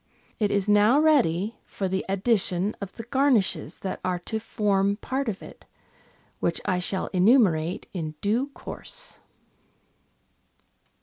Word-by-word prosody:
It 210 -2 +2
is 200 -1 0
now 210 +6 +5
ready 230 - +2
for 195 - -4
the 190 +1 -1
addition 195 -1 +1
of 200 -1 -5
the 230 - -8
garnishes 260 -4 +1
that 190 - -4
are 180 -1 0
to 220 +5 -4
form 200 -3 +1
part 265 +3 -2
of 195 - -5
it, - - -13 0.7
which 170 - 0
I 180 - +1
shall 185 +1 0
enumerate 180 -5 +3
in 155 -4 -4
due 230 +7 0
course. - - -6
200 Hz, 130 wpm, -26 LUFS, 185-230 Hz, 0.7 s, now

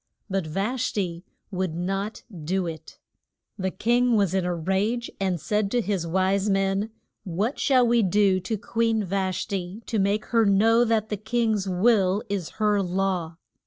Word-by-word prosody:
But 190 -4 -1
Vash 220 +10 -1
ti 175 -4 -3 0.3
would 185 -3 -2
not 195 +5 -3 0.2
do 185 +3 0
it. 165 -2 -8 0.6
Then 195 - -7
the - - +2
king 240 +4 +2
was 200 -4 +2
in 190 -2 +1
a 180 -1 -1
rage, 195 +8 -1
and 190 -3 0
said 210 +5 0
to 245 - +1
his 195 -6 -1
wise 190 +3 +1
men, 195 +2 +1 0.3
What 200 - -2
shall 255 -3 +4
we 235 0 +3
do 195 -1 +3
to 200 +4 -3
Queen 225 +1 0
Vash 190 -1 -1
ti 195 +3 -5
to 220 - -1
make 200 +2 +1
her 230 -1 +5
know 220 +4 +4
that 220 -2 +1
the 210 - -2
king's 220 -2 0
will 195 +1 +2
is 195 -5 -2
her 210 -2 +2
law? 180 -3 -1
195 Hz, 170 wpm, -25 LUFS, 185-220 Hz, 0.6 s, her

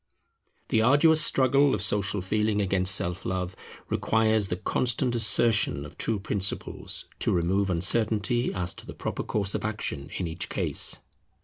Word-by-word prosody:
The 110 - +2
arduous 145 +6 +5
struggle 135 +1 +3
of 100 - -4
Social 100 -2 0
Feeling 105 +2 0
against 95 -1 +3
Self 90 -1 -1
love 95 0 -3 0.3
requires 110 -2 +1
the 90 - -2
constant 125 +6 +1
assertion 110 -10 +2
of 75 - -12
true 110 -3 -2
principles 100 -1 -3
to - - 0
remove 95 +3 0
uncertainty 110 +6 +1
as 90 -2 -3
to - - -9
the - - -9
proper - - -4
course 100 -2 -1
of - - -3
action 105 -10 -4
in 90 - -2
each 80 +1 -5
case. - - -1
105 Hz, 150 wpm, -26 LUFS, 95-110 Hz, 0.3 s, arduous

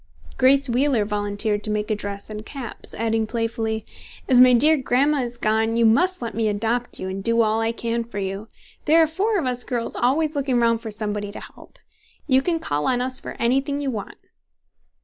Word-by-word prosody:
Grace 275 +2 +4
Wheeler 250 -2 +1
volunteered 205 0 -1
to - - -3
make 210 0 -1
a - - +2
dress 200 0 -6
and 215 0 -6
caps, 255 0 -6
adding, 225 0 0
playfully, 225 -1 -2 0.4
"As 250 -1 +6
my 255 0 +8
dear 300 +6 +5
grandma 280 +2 +1
is 240 -1 -5
gone, 220 +1 +1
you 235 - +4
must 350 +8 +2
let 230 - -4
me 225 -1 0
adopt 230 +4 -2
you 185 - -4
and 190 +1 -5
do 230 +1 +3
all 220 +1 +1
I 225 0 +1
can 235 0 -2
for 230 -3 -10
you. 195 +2 -4 0.4
There 315 +2 +5
are - - +4
four 400 +7 0
of 330 - -1
us 250 -1 -2
girls 240 -3 -3
always 295 +5 +1
looking 270 -3 0
round 230 -1 +2
for 225 - -6
somebody 210 -1 -3
to - - -8
help. - - -14 0.5
You 265 -2 +3
can 335 +3 0
call 145 - -2
on 250 -1 +1
us 255 +1 -2
for - - -8
anything 270 +4 0
you 280 -2 -2
want." 210 -4 -6
230 Hz, 210 wpm, -23 LUFS, 215-265 Hz, 0.5 s, my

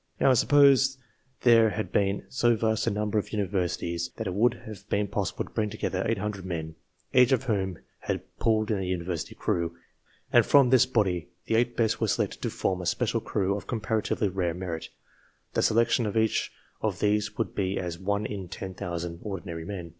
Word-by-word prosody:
Now, 135 - +5
suppose 135 +1 +5 0.4
there 115 -2 +6
had 110 0 -4
been 100 0 +1
so 120 -2 +2
vast 110 0 0
a - - +5
number 105 +1 0
of - - -5
universities 90 -4 -1
that 110 - -3
it 95 - -2
would 115 +5 +3
have 105 -2 -10
been 100 0 +1
possible 100 -1 -2
to - - -16
bring 105 -2 -1
together 95 -3 -2
800 105 -3 -2
men, 80 -3 -4 0.4
each 125 0 +6
of 130 0 +3
whom 95 -7 -1 0.2
had - - -3 0.2
pulled 110 -1 +2
in 105 - +1
a - - -2
University 90 -2 -3
crew, 85 0 -1 0.6
and - - +7
that - - -11
from 135 -3 +6
this 130 0 +6
body 95 -8 0 0.2
the - - -2
eight 120 +1 +2
best 110 -2 +1
were - - +2
selected - - -1
to - - -1
form 95 -1 -1
a 90 - -4
special 115 +4 0
crew 100 -3 0
of 100 - -7
comparatively 110 -2 -1
rare 90 -3 -1
merit: 90 -3 -5 0.6
the - - +1
selection 115 0 +3
of 105 - -2
each 110 0 +1 0.3
of 105 -4 -1
these 105 0 +1
would - - -2
be 95 0 -1
as 85 -2 -4
1 100 +2 -1
to 100 -3 -5
10,000 85 -2 -5
ordinary 85 -5 -5
men. 90 -3 -6
105 Hz, 190 wpm, -27 LUFS, 90-110 Hz, 0.6 s, and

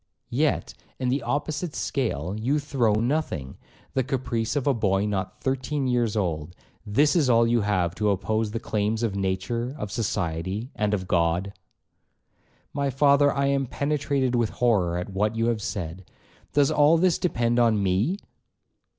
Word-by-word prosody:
'Yet, - - 0 0.2
in 125 - -1
the 135 +3 +1
opposite 145 +6 -2
scale 100 - -2
you 125 +7 0
throw 135 -7 +1
nothing,—the 120 - -3
caprice 125 -2 -2
of 145 - 0
a 140 - +3
boy 100 -4 +1
not 95 -2 -3
thirteen 135 +2 -1
years 120 -4 +1
old;—this 95 - -1
is 150 -7 +3
all 115 -1 +5
you 115 0 +2
have 95 -5 0
to 105 +2 0
oppose 110 +3 0
to 105 - -9
the 115 - -1
claims 110 +2 -1
of 105 -4 -1
nature, 115 +7 -2
of 105 -6 -5
society, 95 - -2
and 105 0 0
of 95 -2 -5
God.' 85 +3 +1 1.2
'My 140 -1 0
father, 140 +1 +4
I 140 0 0
am 140 -1 +1
penetrated 140 -2 0
with 120 -3 +2
horror 100 -9 +1
at 90 +2 -5
what 105 +3 0
you 115 0 +1
have 115 -2 -1
said,—does 95 - -3
all 150 +2 +5
this 180 0 +2
depend 120 -8 +1
on 110 -4 +3
me?' 100 - +1
115 Hz, 155 wpm, -25 LUFS, 100-135 Hz, 1.2 s, all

